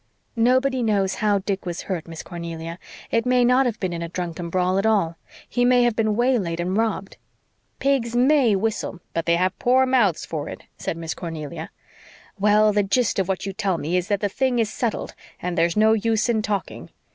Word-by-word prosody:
"Nobody 255 +3 +2
knows 200 -4 +1
how 210 -1 +3
Dick 195 0 -3
was 175 -2 -5
hurt, 175 -4 -4
Miss 165 -1 -8
Cornelia. 170 -1 -7 0.3
It 230 - +2
may 250 -1 +4
not 250 +2 +4
have 225 -3 -3
been 185 -2 -2
in 170 - -4
a 170 - -4
drunken 175 -1 -4
brawl 185 +2 +1
at 200 - -1
all. 195 -7 +2 0.3
He 245 - 0
may 245 0 +5
have 240 -2 +2
been 215 -2 +1
waylaid 225 -9 +1
and 180 +2 -1
robbed." 220 -3 -1 0.6
"Pigs 260 -4 0
MAY 255 -3 +4
whistle, 210 -3 -2
but 165 0 -2
they've 180 +2 +1
poor 260 +2 +4
mouths 240 -10 +2
for 155 -2 -4
it," - - -9
said 165 - -4
Miss 165 -2 -4
Cornelia. 155 -2 -6 0.7
"Well, 210 +1 +4
the 205 - +3
gist 205 +3 +1
of 190 - 0
what 190 -1 -2
you 195 - -4
tell 195 -3 -1
me 160 +3 -2
is 180 0 0
that 205 -1 0
the 205 - +2
thing 260 +4 0
is 225 -2 0
settled 235 -4 -2 0.3
and 180 0 -3
there's 170 +2 +1
no 220 +1 +5
use 225 +1 +1
in 225 -2 +2
talking. 205 -1 -4
205 Hz, 205 wpm, -23 LUFS, 175-235 Hz, 0.7 s, may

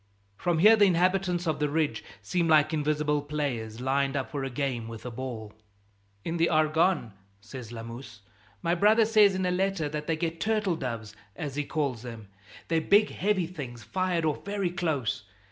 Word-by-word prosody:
From 175 - 0
here, 210 +7 +7
the 210 -2 +5
inhabitants 180 0 +1
of 155 -2 -1
the 150 -1 +1
ridge 145 -8 0 0.2
seem 170 - 0
like 155 0 +4
invisible 150 -1 +1
players, 135 -7 -3
lined 135 +2 0
up 135 - -3
for 140 -2 -3
a 135 - -2
game 125 -3 -2
with 115 0 -9
a 125 - -4
ball. 115 -4 -6 0.7
"In 165 +1 -2
the 170 0 +3
Argonne," 155 - +2 0.3
says 115 +2 -9
Lamuse, 115 -1 -9 0.4
"my 170 0 +2
brother 215 +5 +5
says 210 -3 +5
in 185 0 -1
a 180 - +1
letter 190 -3 0
that 150 0 -5
they 165 - +1
get 165 +1 -3
turtle 215 -5 +1
doves, 115 -7 -5 0.2
as 145 -3 -5
he 150 - 0
calls 140 -6 -2
them. 115 -4 -9 0.4
They're 165 -1 +1
big 205 +5 +4
heavy 195 -3 0
things, 135 -9 -8
fired 185 -3 -1
off 155 -2 -1
very 200 -3 -2
close. 140 - -1
150 Hz, 180 wpm, -28 LUFS, 125-180 Hz, 0.7 s, here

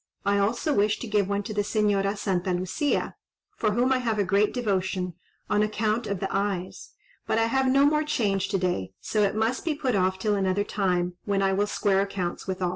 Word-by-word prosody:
I 200 0 +2
also 235 +9 +1
wish 210 -2 +2
to 240 - -6
give 205 -2 +1
one 200 0 -1
to 215 - -5
the 205 - +1
Señora 205 -1 +1
Santa 185 -2 -1
Lucia, 185 - -1 0.4
for 215 -2 0
whom 250 +4 +2
I 255 - +1
have 230 -3 -1
a 205 - +2
great 200 +2 +2
devotion, 190 -6 -1 0.3
on 210 0 +2
account 215 +1 0
of 200 -2 -2
the 195 +1 -3
eyes; 195 -2 -3 0.3
but - - +1
I 225 - +3
have 265 +3 +1
no 275 +1 +5
more 300 +1 +3
change 205 -10 0
to - - 0
day, 175 - -2
so 215 - -1
it 200 0 +2
must 225 +3 0
be 320 -3 -1
put 265 -5 -1
off 185 0 +1
till 210 +2 0
another 195 0 +1
time, 180 -4 -1
when 200 -1 +1
I 195 0 +2
will 205 +2 +1
square 195 -2 +1
accounts 195 -3 -3
with 185 -1 -3
all." 180 - +1
205 Hz, 220 wpm, -26 LUFS, 190-220 Hz, 0.4 s, no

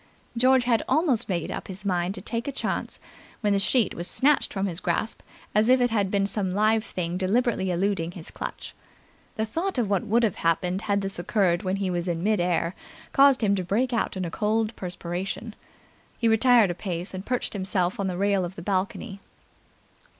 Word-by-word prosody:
George 255 +2 +4
had 240 -2 +2
almost 270 -6 +2
made 175 -4 -2
up - - -5
his 195 +1 -9
mind 180 0 0
to 185 - -6
take 230 +5 -3
a - - -1
chance 275 - -3 0.4
when 205 -2 +2
the 200 - +2
sheet 225 +1 +2
was 170 +1 -3
snatched 290 +2 +2
from 195 -1 -1
his 180 -3 -3
grasp 220 - -2 0.3
as 215 +3 +3
if 255 0 +6
it 245 -1 +2
had 205 -4 +1
been 195 0 +1
some 195 -2 -2
live 215 +1 +3
thing 175 -3 -3
deliberately 200 +1 +1
eluding 180 -1 0
his 170 -3 -9
clutch. - - -6 0.6
The 220 - -1
thought 335 - -2
of 220 -5 0
what 195 -3 +2
would 235 +3 +3
have 215 -5 +1
happened 180 +3 0
had 200 0 +2
this 195 -2 -4
occurred 175 -1 +1
when 190 -2 -1
he 195 -2 -1
was 175 0 -2
in 170 -1 -2
mid 210 -1 +2
air 175 -1 0 0.4
caused 275 -2 +6
him 205 -2 +3
to 190 -2 0
break 240 +8 0
out 230 -4 -1
in 185 - -2
a 165 - -5
cold 215 +3 0
perspiration. 180 +4 -5 0.6
He 230 - +1
retired 225 -3 +5
a - - -2
pace 175 0 -5
and 185 0 -5
perched 250 +3 -2
himself 190 0 0
on 195 - 0
the 180 -2 -3
rail 200 -1 +2
of 180 +1 -5
the 170 - -8
balcony. 195 +2 -2
200 Hz, 205 wpm, -26 LUFS, 180-225 Hz, 0.6 s, if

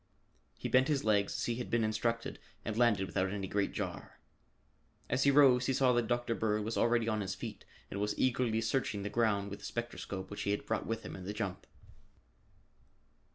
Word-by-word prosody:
He - - -3
bent 130 +1 +4
his 145 -3 +1
legs 105 -2 +2
as - - -1
he 120 -1 -1
had 125 - -4
been 115 -1 +2
instructed 115 +2 -1 0.3
and 110 - -2
landed 115 -5 +3
without 95 +1 0
any 100 -1 -3
great 100 +1 0
jar. - - -5 0.9
As 135 - +2
he - - +6
rose 135 -3 +6
he 135 - +2
saw 130 -1 +4
that 120 -2 +1
Dr. 120 0 0
Bird 105 -2 0
was 110 +2 -3
already 115 -1 +2
on 110 -2 0
his 95 -1 -3
feet 100 - -7 0.3
and 100 - -3
was 105 0 -1
eagerly 120 -3 +2
searching 110 -3 -1
the 105 - -2
ground 100 -4 +1
with 100 - -6
the 100 - -10
spectroscope 100 -4 -5
which 105 - -5
he - - -1
had 105 - -1
brought 110 - -2
with 115 0 -2
him - - -7
in 95 - -8
the 100 - -3
jump. 100 -3 -4
110 Hz, 205 wpm, -33 LUFS, 100-120 Hz, 0.9 s, he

